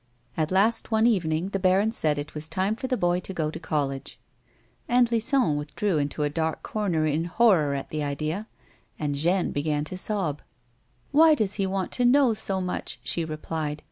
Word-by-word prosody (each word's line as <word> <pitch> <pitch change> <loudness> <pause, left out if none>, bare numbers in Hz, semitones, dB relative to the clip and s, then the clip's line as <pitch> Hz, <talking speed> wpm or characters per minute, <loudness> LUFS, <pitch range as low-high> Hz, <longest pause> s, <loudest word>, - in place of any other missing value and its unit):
At 155 -1 0
last 210 +5 +2
one 220 0 +3
evening 175 -6 +1
the 195 - -2
baron 190 +3 +3
said 155 -9 0
it 145 +1 -5
was 155 +1 -5
time 190 +2 0
for 235 +4 -4
the 255 -1 0
boy 175 -2 +1
to 185 +1 -8
go 155 -2 -1
to - - -7
college. 140 -4 -3 0.7
Aunt 245 -1 +4
Lison 230 - +2
withdrew 155 +4 -1
into 145 +1 -2
a - - +2
dark 160 +1 -2
corner 180 -8 -1
in 155 +2 0
horror 175 -7 +3
at 135 - -5
the 155 - -3
idea, 155 +8 -3 0.5
and 150 -2 -2
Jeanne 170 +6 +1
began 150 0 -1
to 180 +4 -6
sob. 185 -9 -1 0.7
"Why 315 +1 +6
does 210 -7 -1
he 195 - +1
want 190 -1 -2
to 250 - 0
know 255 -1 +5
so 195 -3 -1
much?" 180 -9 -4
she 165 +5 -1
replied. 155 -1 -4
175 Hz, 190 wpm, -26 LUFS, 150-210 Hz, 0.7 s, Why